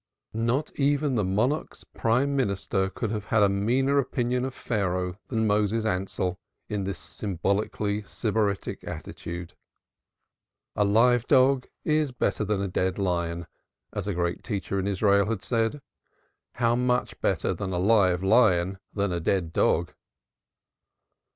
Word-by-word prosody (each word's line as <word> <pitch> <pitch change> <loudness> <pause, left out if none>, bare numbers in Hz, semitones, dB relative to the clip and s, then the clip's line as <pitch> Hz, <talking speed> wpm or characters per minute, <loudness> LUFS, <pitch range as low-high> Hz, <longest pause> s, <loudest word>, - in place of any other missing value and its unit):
Not 115 +7 0
even 145 0 +2
the 110 -4 +1
monarch's 110 +11 -1
prime 130 +5 0
minister 100 -5 0
could 110 +2 -3
have 105 -2 -3
had 110 0 +3
a 100 - +5
meaner 125 +8 +2
opinion 125 -1 0
of 130 - -5
Pharaoh 90 -5 -1
than 110 -3 0
Moses 105 +1 +1
Ansell 90 -2 -1 0.3
in 105 -3 -2
this 100 - -3
symbolically 100 +2 -2
sybaritic 105 -3 -1
attitude. 85 0 -7 1.2
A 105 - +3
live 115 +4 +4
dog 130 -1 +4 0.2
is 155 -2 +1
better 120 -3 -1
than 100 -1 0
a - - -1
dead 95 0 -1
lion, 85 -3 -1 0.5
as - - -3
a 100 - -1
great 85 0 -1
teacher 100 -2 -2
in 95 - -1
Israel 100 +1 +3
had 110 -4 -2
said. 115 +4 -1 0.7
How 120 -1 +2
much 125 0 0
better - - +1
then 95 -2 -4
a 90 - -1
live 95 -2 +3
lion 95 -4 +3 0.2
than 100 -2 0
a 85 - -1
dead 85 -1 0
dog? 85 +1 +2
105 Hz, 140 wpm, -26 LUFS, 95-120 Hz, 1.2 s, a